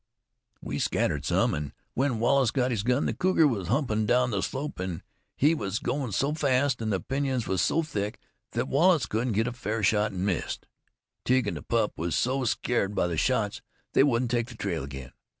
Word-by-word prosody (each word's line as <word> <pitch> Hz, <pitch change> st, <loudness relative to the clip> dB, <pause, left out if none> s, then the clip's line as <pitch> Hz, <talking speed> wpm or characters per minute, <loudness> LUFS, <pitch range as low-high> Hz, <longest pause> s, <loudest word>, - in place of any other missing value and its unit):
We -, -, -3 dB
scattered 70 Hz, -2 st, 0 dB
some, -, -, +2 dB
an' 75 Hz, -1 st, -4 dB, 0.2 s
when 130 Hz, -2 st, +1 dB
Wallace 130 Hz, +2 st, +3 dB
got 125 Hz, 0 st, 0 dB
his 110 Hz, -5 st, 0 dB
gun, 125 Hz, +5 st, +1 dB
the -, -, 0 dB
cougar 180 Hz, -4 st, +3 dB
was 100 Hz, -, -2 dB
humpin' 110 Hz, -, +1 dB
down 125 Hz, +1 st, +3 dB
the 100 Hz, -3 st, 0 dB
slope, 140 Hz, +2 st, -4 dB
an' 90 Hz, -3 st, -4 dB, 0.3 s
he 150 Hz, +4 st, +4 dB
was 105 Hz, -9 st, -2 dB
goin' 130 Hz, -1 st, -2 dB
so 140 Hz, +9 st, 0 dB
fast 135 Hz, -4 st, +1 dB
an' 110 Hz, -, -1 dB
the 95 Hz, -3 st, +1 dB
pinyons 135 Hz, -3 st, -1 dB
was 95 Hz, 0 st, +1 dB
so 165 Hz, -, +2 dB
thick 105 Hz, -7 st, -3 dB, 0.4 s
thet -, -, -1 dB
Wallace 165 Hz, -2 st, +4 dB
couldn't 115 Hz, +2 st, -1 dB
get 110 Hz, +3 st, +2 dB
a 125 Hz, -, -2 dB
fair 110 Hz, -3 st, -3 dB
shot, 105 Hz, +1 st, +3 dB
an' 95 Hz, 0 st, -3 dB
missed. 95 Hz, -4 st, -2 dB, 0.6 s
Tige 130 Hz, -1 st, +2 dB
an' 100 Hz, -, -1 dB
the 75 Hz, -, -6 dB
pup -, -, -1 dB
was 85 Hz, +1 st, -1 dB
so 130 Hz, +2 st, +1 dB
scared 105 Hz, -3 st, 0 dB
by -, -, +2 dB
the 85 Hz, -1 st, -1 dB
shots 110 Hz, +2 st, 0 dB, 0.3 s
they -, -, +5 dB
wouldn't 125 Hz, -3 st, +2 dB
take 120 Hz, -1 st, +1 dB
the 125 Hz, -, -10 dB
trail 90 Hz, -8 st, -2 dB
again. 65 Hz, -2 st, -8 dB
115 Hz, 205 wpm, -27 LUFS, 100-135 Hz, 0.6 s, they